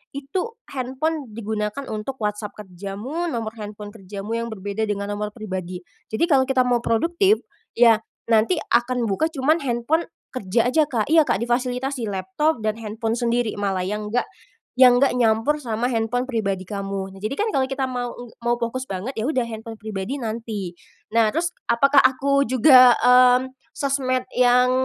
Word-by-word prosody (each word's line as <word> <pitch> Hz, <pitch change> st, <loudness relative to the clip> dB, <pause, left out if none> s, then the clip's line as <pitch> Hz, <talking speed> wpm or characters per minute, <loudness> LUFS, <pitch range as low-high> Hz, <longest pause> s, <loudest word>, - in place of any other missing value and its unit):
itu 355 Hz, -, -4 dB, 0.2 s
handphone 270 Hz, +3 st, -2 dB
digunakan 215 Hz, +3 st, -3 dB
untuk 215 Hz, +5 st, -4 dB
WhatsApp 210 Hz, 0 st, -3 dB
kerjamu, 205 Hz, -, -5 dB
nomor 230 Hz, -7 st, -3 dB
handphone 210 Hz, 0 st, -8 dB
kerjamu 200 Hz, 0 st, -8 dB
yang 230 Hz, -, -3 dB
berbeda 210 Hz, 0 st, -3 dB
dengan 200 Hz, 0 st, -3 dB
nomor 210 Hz, +1 st, -4 dB
pribadi. 185 Hz, -4 st, -6 dB, 0.2 s
Jadi 220 Hz, +9 st, -1 dB
kalau 265 Hz, -2 st, +4 dB
kita 260 Hz, -2 st, +3 dB
mau 245 Hz, -1 st, +2 dB
produktif, 340 Hz, -, +2 dB, 0.3 s
ya 230 Hz, -2 st, +6 dB, 0.3 s
nanti 225 Hz, +10 st, +4 dB, 0.2 s
akan 240 Hz, +1 st, +2 dB
buka 200 Hz, +11 st, +1 dB
cuman 310 Hz, +1 st, +1 dB
handphone 270 Hz, +5 st, 0 dB, 0.2 s
kerja 230 Hz, 0 st, 0 dB
aja 310 Hz, +4 st, +3 dB
Kak 240 Hz, -4 st, -2 dB
iya, 320 Hz, -1 st, +6 dB
Kak, 195 Hz, -, 0 dB
difasilitasi 250 Hz, +1 st, -1 dB
laptop 245 Hz, +9 st, -1 dB
dan 215 Hz, 0 st, -1 dB
handphone 225 Hz, +1 st, -3 dB
sendiri 235 Hz, -1 st, 0 dB
malah 195 Hz, -2 st, -1 dB
yang 210 Hz, +3 st, -3 dB
nggak 245 Hz, -, +2 dB, 0.5 s
yang 250 Hz, 0 st, +7 dB
nggak 275 Hz, -, +4 dB
nyampur 230 Hz, +5 st, +2 dB
sama 235 Hz, -2 st, -2 dB
handphone 245 Hz, +3 st, -1 dB
pribadi 200 Hz, -5 st, -1 dB
kamu. 195 Hz, 0 st, -4 dB
Nah 195 Hz, -, -13 dB
jadi 215 Hz, +6 st, -3 dB
kan 425 Hz, +9 st, -1 dB
kalau 265 Hz, -1 st, +1 dB
kita 265 Hz, 0 st, -2 dB
mau 245 Hz, -1 st, -3 dB
eng 245 Hz, -1 st, -10 dB, 0.2 s
mau 240 Hz, -, +3 dB
fokus 255 Hz, +3 st, -2 dB
banget, 195 Hz, +3 st, -4 dB
ya 220 Hz, -, -1 dB
udah 260 Hz, -5 st, +1 dB
handphone 225 Hz, 0 st, -7 dB
pribadi 215 Hz, +6 st, -4 dB
nanti. 220 Hz, -5 st, -4 dB, 0.4 s
Nah, 225 Hz, -1 st, +3 dB
terus 340 Hz, +2 st, 0 dB, 0.2 s
apakah 275 Hz, +4 st, +3 dB
aku 275 Hz, +2 st, +3 dB
juga, 255 Hz, 0 st, +7 dB
mmm, 250 Hz, +1 st, +5 dB, 0.2 s
sosmed 265 Hz, -2 st, 0 dB
yang 250 Hz, 0 st, +5 dB
235 Hz, 165 wpm, -22 LUFS, 210-265 Hz, 0.5 s, yang